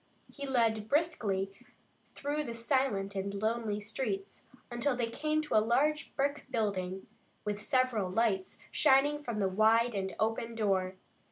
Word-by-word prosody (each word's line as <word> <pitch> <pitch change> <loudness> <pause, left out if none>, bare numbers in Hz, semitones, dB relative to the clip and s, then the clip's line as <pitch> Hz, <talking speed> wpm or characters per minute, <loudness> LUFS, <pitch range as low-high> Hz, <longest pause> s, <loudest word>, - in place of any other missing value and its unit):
He 280 -1 -6
led 225 -4 +1
briskly 205 - 0 0.6
through 290 +2 -2
the 235 - -5
silent 230 -5 0
and 200 +1 -3
lonely 220 -1 -1
streets, 205 -2 -4 0.2
until 245 +3 +1
they 245 -1 0
came 305 +4 0
to 300 - -5
a 215 - +7
large 280 +7 +1
brick 285 +1 -1
building 195 -6 -2 0.4
with 210 0 -2
several 235 -5 +1
lights 195 -2 0
shining 290 +2 +4
from 235 -5 -3
the 200 -2 +2
wide 220 +5 +4
and 190 -1 -3
open 225 +1 -1
door. 190 -4 +1
225 Hz, 145 wpm, -32 LUFS, 200-265 Hz, 0.6 s, a